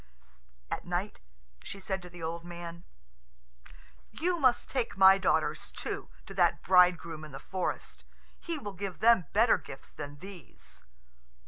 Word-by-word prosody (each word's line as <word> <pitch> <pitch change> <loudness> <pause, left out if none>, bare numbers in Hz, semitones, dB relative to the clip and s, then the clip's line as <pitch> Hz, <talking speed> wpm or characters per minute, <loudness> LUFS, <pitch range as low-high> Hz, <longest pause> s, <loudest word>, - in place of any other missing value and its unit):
At - - -2
night - - -3 0.4
she 200 - -7
said 190 0 -2
to 180 - -10
the 175 -1 -10
old 165 +1 -3
man, 170 0 -8 1.2
"You 345 +9 -1
must 255 -4 +3
take 250 -6 -2
my 190 0 +8
daughters, - - +1
too, - - -5 0.2
to 195 - -9
that 175 -3 +2
bridegroom 175 -3 +4
in 150 -2 -10
the - - -5
forest. 185 -1 -4 0.4
He 335 -2 -3
will 205 -8 -6
give 195 -1 -5
them 225 -8 +5
better 225 +4 +5
gifts 135 - -11
than 145 -1 -7
these." 150 - -10
185 Hz, 145 wpm, -31 LUFS, 170-200 Hz, 1.2 s, my